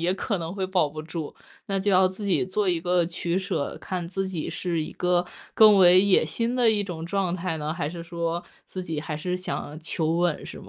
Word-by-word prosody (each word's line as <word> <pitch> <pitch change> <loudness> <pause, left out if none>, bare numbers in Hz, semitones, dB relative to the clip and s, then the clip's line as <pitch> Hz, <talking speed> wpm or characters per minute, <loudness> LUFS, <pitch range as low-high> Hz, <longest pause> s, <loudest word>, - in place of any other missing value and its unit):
也 175 +2 +1
可 195 +1 -2
能 165 +2 -5
会 195 - -2
保 185 -5 +2
不 155 +2 -7
住， 160 -1 -6 0.3
那 195 -1 0
就 205 - +1
要 185 0 +5
自 190 +3 -5
己 190 -1 +2
做 195 +1 0
一 170 -2 +1
个 175 0 +2
取 170 +1 -2
舍， 190 -6 -2
看 180 -2 -4
自 190 +2 -3
己 170 -5 -4
是 170 -3 -2
一 - - -7
个 180 0 +1 0.3
更 215 -2 +7
为 180 0 +7
野 200 -1 +4
心 235 +1 -2
的 240 -3 +4
一 205 -2 0
种 165 -3 -6
状 185 0 -1
态 175 -2 -2
呢， 155 +1 -3
还 150 -4 -2
是 170 0 -7
说 170 0 -3 0.2
自 185 -1 -6
己 160 -3 -3
还 150 0 -4
是 180 +3 -2
想 155 -4 -5
求 160 0 -1
稳 175 -3 0
是 - - -8
吗？ - - -13
180 Hz, 255 characters per minute, -25 LUFS, 165-190 Hz, 0.3 s, 更